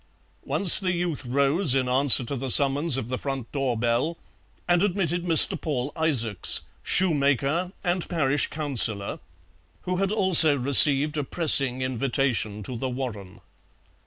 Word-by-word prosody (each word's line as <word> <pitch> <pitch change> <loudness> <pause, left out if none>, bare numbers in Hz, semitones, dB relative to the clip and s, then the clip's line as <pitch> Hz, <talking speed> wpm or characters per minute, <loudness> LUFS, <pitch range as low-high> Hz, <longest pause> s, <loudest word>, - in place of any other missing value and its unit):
Once 190 -4 +5
the 185 -2 -2
youth 170 -6 -5
rose, 140 +4 +1
in 130 -1 -1
answer 130 0 +2
to 130 +4 -6
the 135 0 -6
summons 140 +2 +3
of 130 - -6
the 130 +1 -5
front 135 -4 -7
door 135 -4 -3
bell, 120 +8 -2 0.5
and 175 0 +1
admitted 175 -3 -2
Mr. 170 +1 +5
Paul 140 -3 -4
Isaacs, 120 - 0 0.2
shoemaker 155 0 -1
and 175 -1 -3
parish 145 -4 -1
councillor, 120 -9 -3 0.6
who 180 0 -4
had 195 +1 -2
also 185 -8 +5
received 140 +3 +3
a 145 - -2
pressing 135 -4 +2
invitation 125 -4 -3
to 125 - -8
The 130 - -4
Warren. 115 -8 -8
140 Hz, 140 wpm, -23 LUFS, 125-170 Hz, 0.6 s, Once